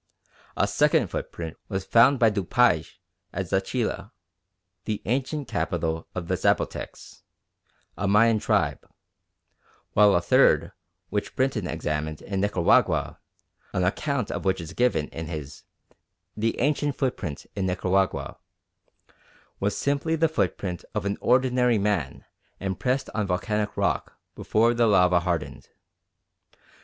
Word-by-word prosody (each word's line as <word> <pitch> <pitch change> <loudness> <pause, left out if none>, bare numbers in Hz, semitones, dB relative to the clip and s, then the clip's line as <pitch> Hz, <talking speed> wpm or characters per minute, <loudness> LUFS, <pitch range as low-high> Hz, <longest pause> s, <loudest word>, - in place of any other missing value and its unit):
A - - +3
second - - +2
footprint 80 -2 -5
was 95 -2 -3
found 125 +6 +5
by 115 -3 +4
Dupaix 100 -4 +1 0.3
at 95 - -3
Zachilla, 100 +4 -2 0.7
the 105 -2 -2
ancient 135 +4 -1
capital 85 -7 -2
of 90 -2 -4
the - - +1
Zapotecs, - - -2 0.7
a 100 - -2
Mayan 110 +2 +4
tribe; - - 0 1.1
while 105 -1 +5
a - - +4
third - - +4 0.4
which 105 0 -3
Brinton 130 -8 0
examined 75 -1 -3
in 95 -1 -3
Nicaragua, 100 -4 +2 0.5
an 90 - 0
account 125 +6 -1
of - - -4
which 95 -1 +1
is 80 -2 -7
given 120 -12 +1
in 80 -1 -6
his 75 -3 -7 0.7
The 115 +1 -1
Ancient 145 +1 +1
Footprints 115 - -3
in 95 -2 -1
Nicaragua, 95 +1 0 1.2
was 100 +1 -1
simply 145 +3 0
the 165 +1 +3
footprint 95 - -2
of - - -2
an 100 0 -2
ordinary 125 -1 +3
man 100 -9 -1 0.3
impressed 125 +8 -2
on 105 -2 -1
volcanic 105 +3 -1
rock - - -1 0.2
before 115 +2 +2
the 120 -1 +3
lava 90 -3 +4
hardened. 85 -2 -3
100 Hz, 125 wpm, -25 LUFS, 90-120 Hz, 1.2 s, found